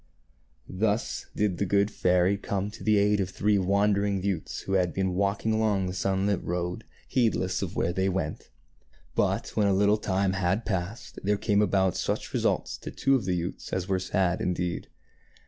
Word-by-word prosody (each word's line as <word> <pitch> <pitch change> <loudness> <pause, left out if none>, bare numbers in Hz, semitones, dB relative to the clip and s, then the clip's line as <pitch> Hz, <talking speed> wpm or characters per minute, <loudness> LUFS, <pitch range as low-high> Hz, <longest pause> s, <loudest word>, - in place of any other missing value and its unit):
Thus 105 +3 -1
did 100 -4 0
the 100 - +1
good 100 +2 +2
fairy 90 +1 +2
come 100 0 -3
to - - -11
the 110 -1 +3
aid 105 +1 +3
of 95 - 0
the 95 - -13
three 105 0 +2
wandering 100 0 +1
youths 95 -5 -2
who 95 - -4
had 90 -3 +1
been 95 -1 0
walking 100 +3 0
along 105 -3 +1
the 90 - -3
sunlit 95 +1 0
road, 90 0 -3 0.2
heedless 110 -7 +1
of - - -4
where 85 - 0
they 95 +1 +1
went. 90 -5 -3 0.6
But, - - 0
when 105 -2 +1
a 100 - +3
little 105 +2 +3
time 95 -1 0
had 95 +4 0
passed, 100 +5 -4
there 105 +1 +2
came 105 -1 +2
about 95 -3 +2
such - - -2
results - - 0
to - - -7
two 135 - +1
of 130 -7 +2
the 90 -1 0
youths 85 +2 -4
as 95 -1 -2
were 95 -1 +1
sad 95 -1 0
indeed. 90 -1 -2
95 Hz, 185 wpm, -27 LUFS, 90-105 Hz, 0.6 s, the